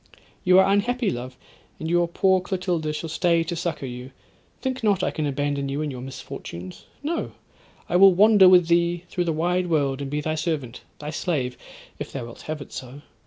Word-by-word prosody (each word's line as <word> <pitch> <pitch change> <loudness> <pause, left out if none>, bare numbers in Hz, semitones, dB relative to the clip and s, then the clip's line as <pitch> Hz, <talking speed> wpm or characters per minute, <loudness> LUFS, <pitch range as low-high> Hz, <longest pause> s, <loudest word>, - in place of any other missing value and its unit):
'—'You 185 0 +5
are 190 +1 +5
unhappy, 240 +2 +1
love, 125 +1 -6 0.4
and 160 - -4
your 175 +1 +2
poor 190 +2 +2
Clotilda 180 -4 -2
shall 155 +2 -4
stay 170 +1 +2
to 170 +1 -4
succour 165 -5 -3
you. 125 +1 -7 0.5
Think 260 -2 -3
not 205 -4 +2
I - - +1
can 155 -2 -2
abandon 140 0 -1
you 140 +3 -2
in 150 - -3
your 125 -2 -7
misfortunes. 90 -8 -8 0.2
No! 330 +3 -2 0.5
I 175 - +2
will 195 +1 +8
wander 205 -1 +7
with 180 -2 +6
thee 170 0 +2
through 175 - -1
the 165 - +1
wide 175 +3 0
world, 140 -4 0
and 140 - -4
be 150 +1 -1
thy 155 +1 -2
servant, 155 -6 -3 0.2
thy 150 0 -6
slave, 145 -6 -2 0.4
if - - -6
thou 130 -4 -5
wilt 115 - -11
have 155 -2 -3
it - - -19
so. 130 +3 -8
160 Hz, 200 wpm, -24 LUFS, 140-180 Hz, 0.5 s, will